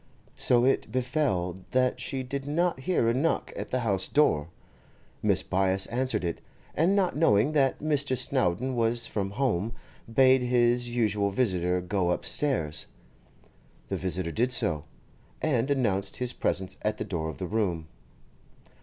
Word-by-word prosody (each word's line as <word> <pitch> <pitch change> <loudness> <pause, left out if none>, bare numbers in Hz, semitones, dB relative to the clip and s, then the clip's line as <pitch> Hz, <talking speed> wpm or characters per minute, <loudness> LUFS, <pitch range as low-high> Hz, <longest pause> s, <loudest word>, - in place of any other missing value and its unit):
So 120 0 +3
it 135 - +1
befell 125 - -1
that 130 0 +1
she 135 -2 -3
did 140 +2 -5
not 170 0 0
hear 130 -4 +1
a 115 - +3
knock 145 +6 0
at - - -5
the 130 - -1
house 95 -5 0
door. 80 - +2 0.8
Mrs. - - +2
Byass 95 0 +1
answered 125 -4 0
it, 85 - -3 0.3
and 175 +6 +2
not 190 -3 +1
knowing 140 -4 +3
that 140 -4 +2
Mr. 145 -3 +1
Snowdon 130 0 0
was 115 0 0
from 100 -2 -2
home, 115 -2 -1 0.4
bade 130 +2 +5
his 120 0 +2
usual 105 -4 +1
visitor 90 -5 0
go 90 0 -1
upstairs. 90 - -1 1.0
The - - -1
visitor 90 -2 -2
did 120 +7 0
so, 80 - +1 0.5
and 135 -4 0
announced 105 -8 0
his 125 0 -2
presence 95 -1 -1
at 105 0 -1
the - - -4
door 80 -4 -3
of 80 - -7
the 95 - -4
room. 90 -6 -1
120 Hz, 150 wpm, -27 LUFS, 95-130 Hz, 1.0 s, bade